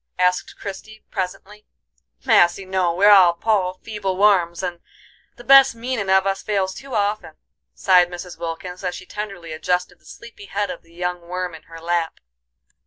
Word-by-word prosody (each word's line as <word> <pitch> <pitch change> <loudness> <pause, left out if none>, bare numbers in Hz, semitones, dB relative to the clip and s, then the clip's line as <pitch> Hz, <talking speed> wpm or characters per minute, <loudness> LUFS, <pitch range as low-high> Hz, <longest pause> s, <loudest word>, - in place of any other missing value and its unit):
asked 180 0 0
Christie, 215 +2 -9
presently. 195 +3 -6 0.6
"Massy, 195 -5 +4
no, 185 -2 0
we're 200 +3 +6
all 180 -4 +7
poor, 185 -1 0
feeble 200 -4 -3
worms, 190 -4 +3
and 175 -2 -4 0.6
the 240 - -13
best 270 -2 +7
meanin' 230 -4 -3
of 190 0 +4
us 195 0 -1
fails 195 -3 -1
too 270 +2 -8
often," 205 0 -1 0.4
sighed 180 -2 +4
Mrs. 175 0 -9
Wilkins, 180 +3 -6
as 180 -1 -2
she 185 - -10
tenderly 195 -6 -7
adjusted 180 +2 -2
the - - -30
sleepy 235 -3 -12
head 200 +1 -2
of - - -8
the 165 0 -23
young 180 0 -3
worm 180 0 -4
in 160 - -11
her 165 0 -10
lap. 170 0 -2
185 Hz, 170 wpm, -21 LUFS, 175-205 Hz, 0.6 s, all